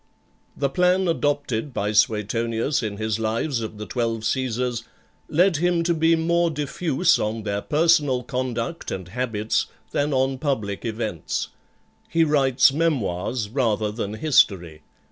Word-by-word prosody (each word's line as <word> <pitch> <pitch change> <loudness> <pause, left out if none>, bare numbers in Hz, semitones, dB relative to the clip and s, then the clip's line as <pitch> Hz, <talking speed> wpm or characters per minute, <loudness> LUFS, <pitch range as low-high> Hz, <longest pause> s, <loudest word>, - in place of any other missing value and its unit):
The 140 - +1
plan 180 +5 +2
adopted 145 -5 -1
by 105 +1 0
Suetonius 115 +5 +1
in 105 -3 -4
his 110 0 -2
Lives 115 +4 -1
of 110 -1 -6
the 105 - -6
Twelve 115 -2 -2
Caesars, 125 0 -1 0.5
led 175 +1 +3
him 175 +1 +1
to 170 0 +2
be 165 +1 +3
more 170 +1 +2
diffuse 155 +2 +1
on 110 +1 -2
their 100 -1 -2
personal 150 -4 +2
conduct 125 +2 -3
and 95 -1 -5
habits 110 -1 -1 0.2
than 145 +1 0
on 130 0 +1
public 110 -9 -2
events. 110 -7 -3 0.6
He 165 0 +3
writes 135 -4 +4
Memoirs 120 - -1
rather 110 -4 0
than 105 -1 -4
History. 95 - +2
125 Hz, 135 wpm, -23 LUFS, 110-150 Hz, 0.6 s, writes